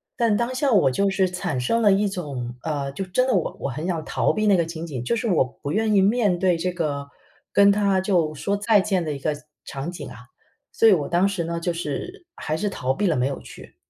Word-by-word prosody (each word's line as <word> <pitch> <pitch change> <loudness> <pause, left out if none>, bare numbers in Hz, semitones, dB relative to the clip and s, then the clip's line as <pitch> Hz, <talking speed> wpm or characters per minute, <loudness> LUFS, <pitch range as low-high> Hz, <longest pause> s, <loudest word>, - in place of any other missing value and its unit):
但 230 -4 +2
当 240 +2 -1
下 275 +1 +1
我 190 - +4
就 195 +9 +1
是 190 -1 +2
产 180 -7 -3
生 230 - +1
了 205 - +5
一 200 +2 +2
种， 140 -10 -5
呃， 145 -3 -2
就 195 +8 -4
真 220 +8 +1
的， 255 - +2
我 180 - -1
我 - - -3
很 155 +7 -4
想 165 -4 -2
逃 - - +1
避 215 0 -1
那 200 -2 +5
个 170 - +2
情 165 0 -6
景， 130 -7 -5
就 235 - 0
是 230 +1 -2
我 175 -9 +3
不 140 +3 -7
愿 215 +2 +1
意 195 - +5
面 205 -4 +2
对 180 -1 +2
这 180 +2 -1
个 145 -5 -3 0.4
跟 200 0 +6
她 200 -2 +2
就 180 -5 +1
说 200 +7 -1
再 210 +1 +3
见 190 -3 0
的 155 - -3
一 140 - -5
个 150 +2 -1 0.3
场 140 +5 -5
景 180 - -8
啊。 - - -11 0.5
所 225 - +4
以 210 - +8
我 150 -5 0
当 175 +3 +3
时 190 -4 -2
呢， 170 0 -3
就 175 0 -1
是 175 - -5
还 155 - -3
是 205 +4 -1
逃 130 -8 -1
避 205 +5 0
了， 165 - +2
没 125 - +1
有 140 - -4
去。 - - -13
180 Hz, 270 characters per minute, -23 LUFS, 155-205 Hz, 0.5 s, 以